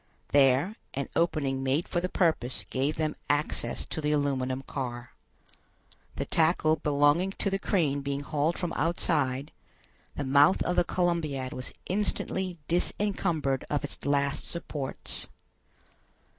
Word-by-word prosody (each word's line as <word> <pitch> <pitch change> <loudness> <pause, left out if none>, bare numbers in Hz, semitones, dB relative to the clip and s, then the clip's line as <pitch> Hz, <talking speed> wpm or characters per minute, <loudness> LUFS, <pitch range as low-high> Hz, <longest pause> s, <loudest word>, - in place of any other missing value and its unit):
There, 140 - +4 0.2
an 140 0 -2
opening 145 -6 +1
made 135 +5 +1
for 175 - 0
the 180 - -1
purpose 160 -10 +1
gave 140 +4 0
them 155 -1 -1
access 145 +1 0
to 160 - -4
the 150 0 +1
aluminum 135 -3 0
car. 120 -3 -5 1.0
The - - -2
tackle 160 -1 +3
belonging 145 +6 +3
to 200 - -2
the 195 - 0
crane 150 -9 +1
being 140 0 -2
hauled 150 +3 0
from 175 -2 -2
outside, 150 -4 0 0.6
the 145 - -2
mouth 145 +6 +5
of 180 - 0
the - - +4
Columbiad 160 -8 -1
was 125 - -5
instantly 190 -2 -1
disencumbered 170 -6 0
of 145 +1 0
its 145 - -6
last 140 0 +1
supports. 150 -5 -5
150 Hz, 130 wpm, -29 LUFS, 135-170 Hz, 1.0 s, mouth